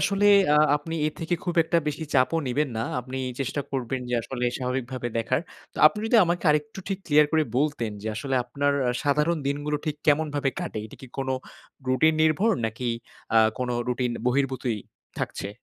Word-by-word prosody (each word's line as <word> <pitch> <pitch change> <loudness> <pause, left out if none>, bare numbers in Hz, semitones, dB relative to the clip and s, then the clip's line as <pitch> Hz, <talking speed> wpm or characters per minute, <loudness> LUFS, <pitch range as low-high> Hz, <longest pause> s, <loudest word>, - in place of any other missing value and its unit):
আসলে 200 +1 +2 0.3
আ - - +5 0.2
আপনি 160 +3 -6
এর 155 - -2
থেকে 165 +2 0
খুব 175 - -1
একটা 170 +1 +2
বেশি 150 +2 -2
চাপও 165 +6 +3
নিবেন 145 +4 0
না। 110 - -1 0.2
আপনি 130 +2 -6 0.2
চেষ্টা 135 +2 -1
করবেন 130 -1 -2
যে 125 - 0
আসলে 125 +1 -4
স্বাভাবিকভাবে 125 -1 -3
দেখার। 115 - +1 0.3
তো - - -20
আপনি 210 - +2
যদি 235 - +4
আমাকে 175 +1 -1
আরেকটু 150 +3 -1
ঠিক 195 - -2
ক্লিয়ার 150 -1 +5
করে 160 -1 +4
বলতেন 140 -6 0
যে, 110 - -6
আসলে 135 +4 -2
আপনার 145 +2 0 0.3
সাধারণ 150 +4 +2
দিনগুলো 145 +1 -1
ঠিক 150 -1 -1
কেমনভাবে 145 -2 +2
কাটে? 110 - -4
এটা - - -13
কী 130 - -10
কোনো 135 -1 -1 0.6
রুটিন 155 +5 +4
নির্ভর 160 +8 +3 0.2
নাকি 115 +3 -6 0.5
আ - - +8 0.2
কোনো 125 -1 -1 0.2
রুটিন 125 0 0 0.2
বহির্ভূতই 130 -3 0 0.4
থাকছে? 100 - -3
140 Hz, 175 wpm, -26 LUFS, 125-155 Hz, 0.6 s, আ